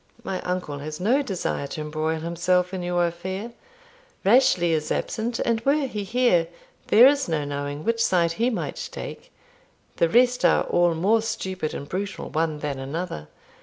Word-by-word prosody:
My 190 -4 -3
uncle 180 -6 -3
has 150 +2 -6
no 240 +10 +2
desire 190 - -3
to 155 - -6
embroil 155 +1 -2
himself 180 +2 0
in 185 - -3
your 175 0 +1
affair; 190 +6 -4 0.7
Rashleigh 195 -6 +4
is 155 -1 -3
absent, 230 +2 -2
and 230 -1 0
were 280 +3 +2
he 210 -5 -4
here, 215 -6 +2 0.4
there 235 +3 +7
is 280 -5 +4
no 155 -3 0
knowing 145 +1 -4
which 230 0 +1
side 170 -2 +2
he 230 +9 +1
might 235 - -4
take; - - -8 0.7
the 170 - +3
rest 245 +3 +3
are - - +4
all 175 -1 +2
more 205 +7 +3
stupid 190 -7 -3
and 140 - -6
brutal 200 +4 -4
one 155 -1 -1
than 140 -2 -3
another. 135 - -5
180 Hz, 165 wpm, -24 LUFS, 160-225 Hz, 0.7 s, there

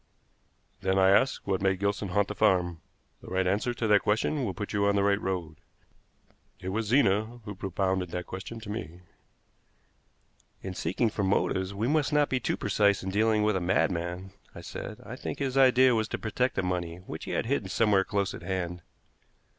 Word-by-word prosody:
"Then, 95 0 0
I 95 0 +5
ask, 130 +7 +2
what 95 -2 0
made 95 -1 +2
Gilson 100 +1 -1
haunt 100 +2 +1
the - - -4
farm? 90 -6 +2 0.4
The - - -13
right 95 0 0
answer 100 +6 +1
to 115 - -2
that 105 -2 +5
question 110 +7 0
will 100 -6 -2
put 105 -1 -5
you 100 0 +2
on 100 - +2
the 100 - +2
right 100 0 +2
road. 85 -5 -3 1.0
It 90 - -5
was 110 +3 -2
Zena 115 -1 +2
who 105 - -5
propounded 95 -1 -1
that 90 +1 -4
question 95 +5 -7
to 105 -2 -7
me." 90 -5 -6 1.6
"In 95 - -4
seeking 95 +7 0
for 100 - -2
motives 95 0 0
we 110 +4 -1
must 150 +1 +1
not 150 -1 +3
be 130 - +1
too - - -1
precise 100 -1 +2
in 95 - -3
dealing 110 +1 +2
with 105 -1 +2
a 95 - 0
madman," 90 0 -1 0.2
I - - -8
said. - - -7
"I - - -7
think - - -5
his 135 -2 -2
idea 130 -1 +6
was 110 -1 +1
to - - -3
protect 125 +4 -1
the 95 - 0
money 90 -2 -2
which 90 -3 -8
he - - -5
had - - 0
hidden 115 -6 -1
somewhere 100 -1 +3
close 100 -1 -1
at - - -8
hand." 90 -2 -3
100 Hz, 200 wpm, -28 LUFS, 95-110 Hz, 1.6 s, idea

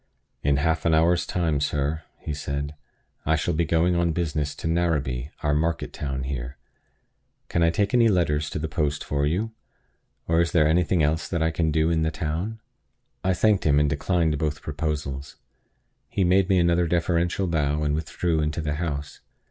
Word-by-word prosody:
"In 70 -1 +2
half 80 +2 +1
an 80 -1 +4
hour's 85 +2 +3
time, 80 -5 0
sir," 75 +2 -1 0.2
he 75 - -5
said, 70 0 -3 0.5
"I 80 - +2
shall 80 +3 0
be 85 +2 +1
going 85 +3 +2
on 85 -1 +1
business 75 -3 -2
to - - -5
Narrabee, 75 -6 0
our 75 -1 +2
market 80 +3 -1
town 70 -2 -3
here. 65 0 -5 0.9
Can 85 - 0
I 85 - +5
take 100 +4 0
any 120 -2 +5
letters 75 -7 +1
to - - -4
the 80 +1 -2
post 75 -3 -1
for 70 0 0
you? 100 +9 -1 0.8
or 80 0 +3
is 85 -3 0
there 75 -3 +4
anything 85 +1 +2
else 80 +2 +1
that 85 -3 -1
I 80 - +2
can 80 0 0
do 80 +2 +2
in 80 -1 +1
the 80 - +2
town?" 80 +8 -3 0.6
I 95 0 +2
thanked 105 0 +3
him, 75 -1 +4
and 75 - +3
declined 80 +1 0
both 75 -1 -2
proposals. 75 -2 -4 0.7
He 100 - 0
made 95 +1 +3
me 95 - +4
another 85 0 +3
deferential 85 +2 +1
bow, 75 -3 0
and 75 -1 +1
withdrew 80 +1 -1
into 75 +2 -1
the 75 -1 -2
house. 75 -3 -4
80 Hz, 185 wpm, -25 LUFS, 75-85 Hz, 0.9 s, I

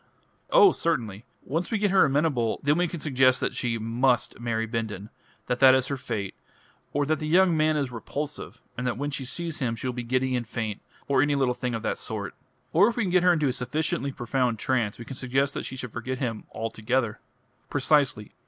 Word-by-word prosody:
"Oh, 435 -6 +7
certainly! 115 -10 -2 0.2
Once 165 +6 -2
we 225 - 0
get 205 -1 +1
her 195 - +6
amenable, 140 -5 +1
then 145 +1 +3
we 175 +1 +2
can 170 0 -6
suggest 130 -3 +3
that - - -1
she 120 -2 -1
must 120 +3 +1
marry 115 -1 -1
Bindon 110 -3 -4 0.3
that 125 0 -1
that 130 -1 +8
is 130 -1 +1
her 140 - -1
fate; 115 -7 -4 0.6
or 145 0 0
that 155 +2 0
the 155 - -3
young 175 +1 +4
man 155 0 +2
is 140 -4 -1
repulsive, 145 +5 -6
and 125 - -3
that 120 - -1
when 145 +2 -2
she 135 -1 -4
sees 165 +4 -5
him 120 -4 -1
she 115 - -8
will 125 - -2
be 125 - -4
giddy 130 +2 0
and 120 -2 -2
faint, 110 -3 -4 0.3
or 135 -2 +3
any 145 +1 +2
little 135 -3 +2
thing 125 -1 -3
of 115 - -5
that - - -1
sort. 105 -3 -4 0.4
Or 190 +6 +6
if 235 - -2
we 240 - +1
can 185 - -1
get 180 0 +4
her 180 0 +5
into 155 -4 +1
a 130 - 0
sufficiently 140 +1 -2
profound 125 -1 -1
trance 115 -3 0
we 115 - -9
can 135 - -8
suggest 135 +2 0
that - - -4
she - - -6
should 125 -3 -7
forget 130 +2 -4
him 115 -5 -3
altogether 115 +1 -2 0.2
" - - -41
"Precisely." 140 -9 +2
130 Hz, 225 wpm, -26 LUFS, 115-150 Hz, 0.6 s, that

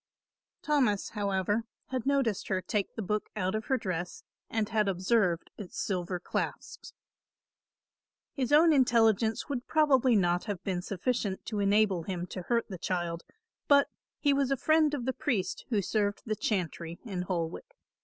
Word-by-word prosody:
Thomas, 255 -9 +2
however, 205 +1 -1 0.2
had 255 -1 -3
noticed 270 -8 +1
her 190 -2 0
take 200 +1 -2
the 225 - -3
book 210 +3 -2
out 190 -2 -1
of 215 +2 -2
her 265 - +1
dress 180 -5 -4 0.3
and 220 -2 0
had 215 -1 +1
observed 185 -2 +1
its 200 -4 -7
silver 180 -2 -2
clasps. - - -4 1.4
His 265 -1 -2
own 315 +2 +6
intelligence 225 -4 +3
would 260 -4 -4
probably 270 -6 +4
not 175 -3 +2
have 205 -5 -4
been 185 -2 -1
sufficient 200 +1 -2
to 215 -3 -3
enable 200 -2 +3
him 175 0 -4
to 185 - -4
hurt 235 +6 0
the 185 -4 -7
child, 175 -2 -2 0.5
but 280 -1 +5 0.3
he 285 -2 +2
was 275 -1 +1
a 275 - +1
friend 310 +1 +3
of 250 -4 -4
the 260 - 0
priest 195 -11 -2
who 210 -5 +1
served 205 +1 0
the 215 -2 -1
chantry 175 -5 -2
in 190 -5 -3
Holwick. 180 - -4
210 Hz, 160 wpm, -30 LUFS, 185-250 Hz, 1.4 s, own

